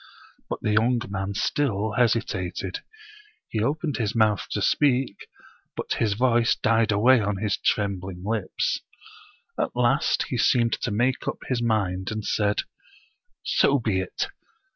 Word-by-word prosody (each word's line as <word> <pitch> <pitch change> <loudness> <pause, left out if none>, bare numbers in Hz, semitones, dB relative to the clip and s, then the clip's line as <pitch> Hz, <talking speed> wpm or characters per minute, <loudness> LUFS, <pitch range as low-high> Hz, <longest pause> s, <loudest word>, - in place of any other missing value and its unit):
But - - -4
the 105 - +1
young 115 +3 +3
man 95 0 -3
still 110 -6 0
hesitated. 100 -5 -1 0.7
He 110 - -2
opened 150 +5 -1
his 110 -3 -1
mouth 110 -3 +2
to - - -2
speak, 130 -7 +1 0.5
but - - -3
his 110 -3 +1
voice 120 0 +3
died 115 -1 +2
away 120 +5 +5
on 105 -1 -1
his 105 0 -1
trembling 95 -3 -1
lips. 110 -3 -1 0.8
At - - -1
last 125 +3 +2
he 125 - -2
seemed 115 0 +3
to 125 - -1
make 120 +5 0
up - - -1
his 125 -2 0
mind, 95 -5 0
and 110 -1 -4
said: 105 -1 +1 0.8
"So 140 - +3
be 110 -6 0
it! 95 - -2
110 Hz, 140 wpm, -25 LUFS, 100-120 Hz, 0.8 s, away